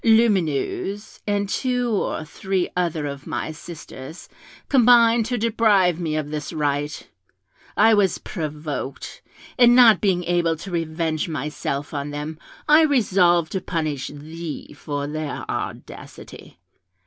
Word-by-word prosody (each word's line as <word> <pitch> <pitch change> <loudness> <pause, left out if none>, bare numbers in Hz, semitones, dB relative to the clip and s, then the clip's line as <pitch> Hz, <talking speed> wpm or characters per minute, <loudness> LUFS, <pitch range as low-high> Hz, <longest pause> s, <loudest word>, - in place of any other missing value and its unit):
Lumineuse, 205 -2 +1
and 205 -1 0
two 245 +2 -1
or 195 -6 -1
three 190 +3 -2
other 170 -4 -1
of 140 -1 -6
my - - -3
sisters, 155 -2 -10 0.4
combined 235 -3 +5
to 245 +1 -1
deprive 210 -6 +3
me 160 -3 -2
of 150 -1 -3
this 150 -1 -4
right; 145 0 -2 0.7
I 220 +2 +6
was 200 -4 +3
provoked, 150 -5 -6 0.4
and 240 -1 +7
not 240 -3 +7
being 185 -4 +1
able 170 -1 +1
to 185 +4 -9
revenge 165 -1 -2
myself 145 -1 -4
on 145 0 -3
them, 150 +2 -6 0.3
I 305 +2 +7
resolved 185 - +3
to 190 - -2
punish 155 -6 -2
thee 155 +2 -8
for 145 -1 -4
their 150 0 -4
audacity. - - -7
170 Hz, 125 wpm, -22 LUFS, 150-210 Hz, 0.7 s, and